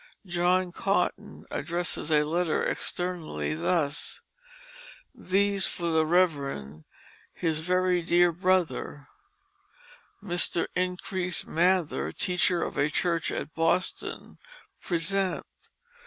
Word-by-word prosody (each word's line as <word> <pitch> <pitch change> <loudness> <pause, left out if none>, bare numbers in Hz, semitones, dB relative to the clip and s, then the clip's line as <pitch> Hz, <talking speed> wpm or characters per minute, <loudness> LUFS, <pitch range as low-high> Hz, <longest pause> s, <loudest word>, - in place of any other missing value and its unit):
John 180 0 +1
Cotton 195 +3 -1
addresses 175 -2 -1
a 150 -1 +4
letter 165 +1 0
externally 160 - -2
thus: 145 - -1 0.9
"These, 200 +1 +2
For 170 -1 -2
the 160 -1 +2
Reverend, 140 - 0 0.5
his 160 -3 -1
very 180 +1 +1
deare 175 +1 +4
Brother, 175 -4 -1 1.1
Mr. 175 -2 +2
Increase 180 0 -1
Mather, 175 0 +1
Teacher 180 -2 +1
of - - -4
a 145 - +2
Church 165 +1 0
at 155 - -5
Boston, 165 +3 -1 0.4
Present." 185 +2 0
175 Hz, 95 wpm, -27 LUFS, 160-185 Hz, 1.1 s, a